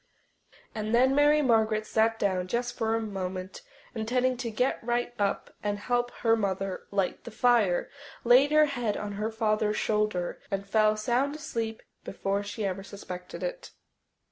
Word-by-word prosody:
And 215 +1 -1
then 260 +2 +4
Mary 295 +1 +4
Margaret 220 -3 +2
sat 225 +1 +2
down 185 -4 0
just 240 +4 -2
for 225 0 0
a - - +1
moment, 190 - -5 0.3
intending 250 +3 0
to 240 -1 -3
get 250 +4 0
right 240 +1 -1
up 200 -1 -1
and 205 -1 -1
help 245 +3 0
her 225 -1 +4
mother 195 -3 -2
light 195 -2 -1
the - - -8
fire, 225 -6 +2 0.4
laid 255 +5 +6
her 305 0 +6
head 245 -7 -2
on 210 -1 -4
her 210 +2 -2
father's 215 -1 0
shoulder, 210 -5 -1
and 195 -1 -2
fell 215 +1 +3
sound 250 +6 0
asleep 230 -8 -4 0.2
before 195 +1 -2
she 205 +1 -4
ever 195 0 -2
suspected 185 -3 -8
it. - - -5
220 Hz, 160 wpm, -28 LUFS, 200-245 Hz, 0.4 s, laid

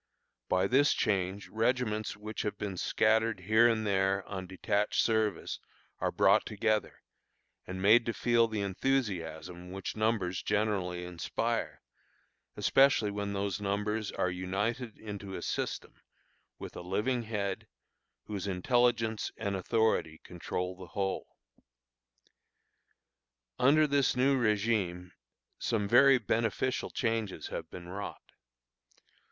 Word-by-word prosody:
By 95 0 +3
this 135 +8 +4
change 95 0 -1
regiments 110 -2 0
which 110 +1 -5
have 105 -1 -3
been 100 -3 -4
scattered 110 +3 +2
here 110 +5 +5
and 110 -2 +1
there 95 -1 +1
on 95 -2 -5
detached 100 +3 0
service 110 -2 +1 0.4
are - - 0
brought - - +4
together, 110 -1 -1 0.6
and 95 +1 -5
made 115 +4 +6
to 115 - 0
feel 120 -1 +3
the 110 -2 -3
enthusiasm 90 -6 -2
which 95 +1 -5
numbers 110 -5 0
generally 95 -4 -1
inspire, 90 -1 -3 0.7
especially 135 -6 +4
when 100 0 -3
those 100 0 -2
numbers 105 +2 -1
are 90 - 0
united 105 +6 -2
into 100 -3 -7
a - - -6
system, - - -3 0.6
with - - -9
a - - -6
living 105 +8 0
head, 105 -4 -3 0.6
whose 100 -2 -5
intelligence 115 +3 +1
and 100 -3 -2
authority 95 -5 +1
control 90 +1 -4
the 90 -1 -10
whole. 95 -1 -1 2.3
Under 145 +5 +5
this 140 -2 +2
new 135 +2 +3
régime 100 -5 0 0.5
some 105 -3 0
very 130 +5 +7
beneficial 115 +3 -1
changes 115 - -2
have - - -5
been 85 -1 -9
wrought. 100 +3 -7
105 Hz, 120 wpm, -31 LUFS, 95-115 Hz, 2.3 s, very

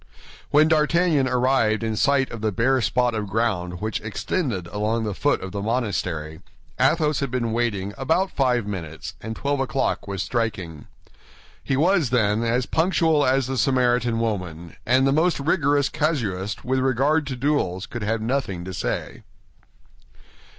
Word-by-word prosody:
When 150 +2 +5
D'Artagnan 160 -2 +3
arrived 125 -3 +2
in 110 -1 -1
sight 140 +3 +2
of 115 - -7
the 110 -1 0
bare 125 +6 +2
spot 120 +4 +1
of 105 -2 -3
ground 95 -5 -1
which 110 0 -2
extended 110 - -2
along 105 +5 -1
the 105 -2 -2
foot 145 +9 +1
of 95 - -6
the 100 - -4
monastery, 95 -8 -2 0.4
Athos 150 +3 +2
had 140 - -2
been 120 -2 -1
waiting 105 -4 -1
about 165 +8 +1
five 125 -5 +1
minutes, 80 -8 -6
and 110 0 -5
twelve 140 +4 -1
o'clock 130 -5 -1
was 100 -2 -3
striking. 95 - -3 0.8
He 135 - 0
was, 170 -2 +3
then, 110 -3 +2
as 120 +2 +1
punctual 160 -2 +2
as 130 0 +2
the 130 0 -2
Samaritan 125 -3 +2
woman, 90 -7 -3
and 130 +2 +4
the 135 - +3
most 160 +4 +2
rigorous 145 -1 +2
casuist 105 - -2
with 130 +1 +1
regard 135 +4 +1
to 130 - -3
duels 125 -9 0
could 120 - -7
have 110 +1 -1
nothing 110 -8 -2
to 95 - -6
say. - - -4
120 Hz, 155 wpm, -23 LUFS, 105-140 Hz, 0.8 s, When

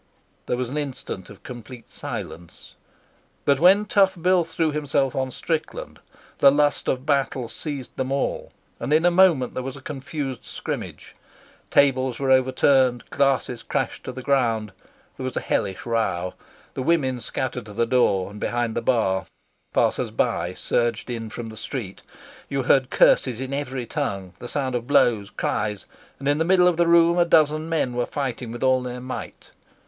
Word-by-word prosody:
There 125 - 0
was 125 -1 -3
an 150 - -1
instant 130 -9 -5
of 100 - -14
complete 120 -1 -10
silence, 85 0 -7 0.7
but 140 -1 +3
when 195 +5 +6
Tough 195 -3 +3
Bill 180 +1 +3
threw 165 -1 -1
himself 145 -3 0
on 130 -1 -1
Strickland 165 - -4 0.4
the 140 - +7
lust 145 +1 +1
of 130 +1 -1
battle 135 -4 0
seized 140 +1 -6
them 130 0 -2
all, 140 0 -2 0.3
and - - -4
in 160 +2 +4
a 175 - +5
moment 175 -8 +4
there - - -3
was 135 +1 -6
a - - -9
confused 135 -1 -5
scrimmage. - - -6 0.5
Tables 130 -3 +3
were 135 -1 0
overturned, 130 -1 +3
glasses 130 -4 +1
crashed - - -3
to - - -4
the 130 0 -8
ground. 115 -6 +1 0.5
There - - -6
was 130 -1 -3
a - - +3
hellish 95 -1 -2
row. 100 -6 -1 0.4
The - - -4
women 130 -4 +1
scattered 125 -1 -3
to 105 - -9
the 115 +3 +1
door 100 -6 +2
and 105 - -10
behind 120 +1 -1
the 120 - -1
bar. 110 -7 +1 0.4
Passers - - +1
by - - -1
surged 120 0 -1
in 115 -2 -4
from 115 +1 -6
the 110 - -10
street. 110 -5 -6 0.5
You 140 -1 -1
heard 130 +1 +3
curses 125 -3 +4
in 130 +1 -4
every 135 -3 -3
tongue 100 - -3
the 120 - -7
sound 130 -1 -2
of 120 -1 -3
blows, 110 -8 +3
cries; 105 -1 -2 0.3
and 135 - -5
in 145 +1 +2
the - - +3
middle 180 +1 +4
of 175 -2 +2
the 170 0 +3
room 170 +1 +5
a - - +6
dozen 155 -1 +3
men 155 -6 0
were 120 0 -1
fighting 130 -4 -4
with 120 +2 -6
all 130 -1 +3
their 125 0 -5
might. 130 +1 -7
130 Hz, 175 wpm, -24 LUFS, 120-145 Hz, 0.7 s, the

